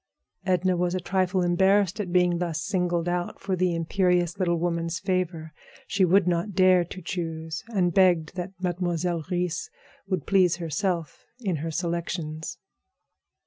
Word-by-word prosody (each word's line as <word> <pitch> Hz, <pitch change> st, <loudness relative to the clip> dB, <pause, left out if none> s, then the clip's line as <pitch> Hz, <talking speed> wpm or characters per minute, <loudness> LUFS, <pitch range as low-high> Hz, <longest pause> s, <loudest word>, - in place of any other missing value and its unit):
Edna 185 Hz, 0 st, +2 dB
was 175 Hz, +1 st, 0 dB
a -, -, 0 dB
trifle 185 Hz, +1 st, 0 dB
embarrassed 190 Hz, +3 st, +3 dB
at 190 Hz, -4 st, -3 dB
being 180 Hz, -1 st, +3 dB
thus 170 Hz, -3 st, -2 dB
signaled 175 Hz, -2 st, 0 dB
out 175 Hz, 0 st, -2 dB
for 190 Hz, -1 st, -1 dB
the 180 Hz, -1 st, +1 dB
imperious 180 Hz, +1 st, +1 dB
little 175 Hz, -2 st, +2 dB
woman's 170 Hz, 0 st, -1 dB
favor. 180 Hz, -5 st, -2 dB, 0.3 s
She 200 Hz, -2 st, +2 dB
would 185 Hz, +1 st, +4 dB
not 175 Hz, +3 st, 0 dB
dare 185 Hz, -2 st, +5 dB
to 185 Hz, +1 st, -9 dB
choose, 160 Hz, -2 st, -4 dB
and 185 Hz, -7 st, +1 dB
begged 175 Hz, -4 st, +3 dB
that 185 Hz, +1 st, -5 dB
Mademoiselle 175 Hz, -2 st, -1 dB
Reisz 175 Hz, -3 st, -2 dB, 0.4 s
would 185 Hz, -6 st, -2 dB
please 185 Hz, -3 st, +4 dB
herself 175 Hz, 0 st, -2 dB, 0.2 s
in 190 Hz, -9 st, -1 dB
her 160 Hz, +3 st, -3 dB
selections. 170 Hz, -1 st, -3 dB
175 Hz, 145 wpm, -26 LUFS, 170-185 Hz, 0.4 s, dare